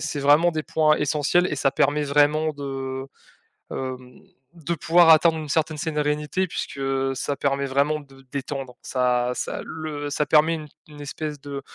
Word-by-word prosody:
c'est 145 - -3
vraiment 150 +5 +5
des 155 -2 -3
points 155 -1 +3
essentiels 150 +5 +2
et - - -2
ça 135 - +2
permet 145 +2 +1
vraiment 150 +2 +2
de 135 -2 -5 0.7
hem, 130 -1 -6 0.3
de 170 -1 -4
pouvoir 165 +2 +4
atteindre 160 0 +6
une 155 -2 -6
certaine 155 0 0
sérenité 150 +3 -1
puisque 140 - -5
heu, 135 0 0
ça 140 +2 -2
permet 140 0 -1
vraiment 140 +3 +1
de 135 -2 -17
détendre. 135 -2 -5
Ça 125 -1 0
ça - - -4
le 150 -2 -5
ça 150 - 0
permet 155 +3 +4
une 155 -1 -7 0.2
une 150 -1 -12
espèce 150 +1 -5
de 140 -1 -6
145 Hz, 170 wpm, -24 LUFS, 135-155 Hz, 0.7 s, atteindre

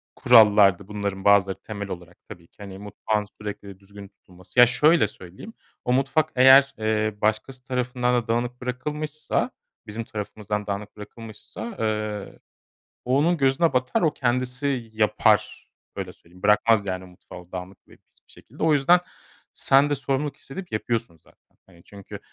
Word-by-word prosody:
kurallardı 105 -6 +5
bunların 100 -2 -4
bazıları 100 -1 +4
temel 100 -2 -7
olarak 90 -1 -9
tabii 85 -1 -12
ki - - -41
hani 100 -2 -9
mutfağın 105 +1 -3 0.2
sürekli 100 -2 -8
düzgün 100 0 -13
tutulması. 95 +2 -8
Ya, 125 - +10
şöyle 150 0 +3
söyleyeyim. 95 - -12 0.3
O 125 - +1
mutfak 140 +4 +1
eğer, 135 +2 +7
eee, 110 -1 0
başkası 110 +4 -1
tarafından 125 -1 -1
da - - -23
dağınık 120 +2 -2
bırakılmışsa, 150 +4 -3 0.4
bizim 110 +2 -5
tarafımızdan 105 -1 -5
dağınık 100 +1 -5
bırakılmışsa, 115 - -9
eee, 105 -2 -3 0.7
o 130 +2 +2
onun 170 +4 +2
gözüne 135 +3 +2
batar, 125 0 0
o 160 -4 +2
kendisi 125 +2 -1
y 125 -5 -2
yapar. 110 -1 +2 0.3
Öyle 95 -2 -6
söyleyeyim. 90 +2 -21
Bırakmaz, 105 +1 +3
yani, 95 -1 -4
mutfağı 90 -1 -14
dağınık 90 +1 -7
ve - - -19
pis - - -35
bir - - -23
şekilde. - - -10
O 160 - +4
yüzden 150 +5 +4 0.5
sen 140 +2 +4
de 145 - +1
sorumluluk 140 +2 -3
hissedip 180 +6 -10
yapıyorsun 110 -4 -3
zaten. - - -29
Hani, 85 -3 -21
çünkü 100 -1 -11
110 Hz, 155 wpm, -24 LUFS, 100-130 Hz, 0.7 s, Ya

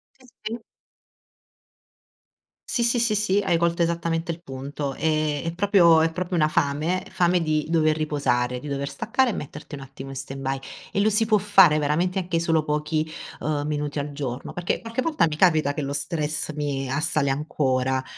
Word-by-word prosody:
Sì, 260 - -21 0.2
sì. 220 +2 -3 2.1
Sì, 235 - +1
sì, 235 +1 +2
sì, 230 -2 +2
sì, 205 -1 +2
hai 195 -4 +1
colto 170 0 +1
esattamente 170 0 -1
il 170 - -13
punto, 140 0 -5
ehm, 155 -2 0
è 165 - -2
proprio 175 -4 +5
è 160 0 +2
proprio 180 +1 -3
una 155 -2 +3
fame, 155 +6 0
fame 175 0 +2
di 155 -2 0
dover 155 -2 +3
riposare, 125 -5 0
di 150 - -9
dover 140 0 -3
staccare 245 - +1
e 220 - -1
metterti 150 +1 -7
un 140 - -9
attimo 135 0 -9
in 135 - -7
stand-by 135 0 -4 0.3
e 200 - -1
lo 215 +2 +4
si 215 +2 +2
può 215 -1 +4
fare 195 -6 +5
veramente 170 +6 0
anche 175 -2 -1
solo 165 -2 +2
pochi, 150 +1 -1 0.3
uhm, 150 -1 -1
minuti 150 -1 -2
al 145 +1 -4
giorno, 135 -3 -5
perché 175 -1 -2
qualche 230 +2 -3
volta 310 - +2
mi 150 - -4
capita 155 -6 +3
che 150 - -3
lo 140 0 -3
stress 150 +1 -2
mi 140 -3 -2
assale 150 0 0
ancora 130 -2 0
155 Hz, 180 wpm, -24 LUFS, 145-180 Hz, 2.1 s, proprio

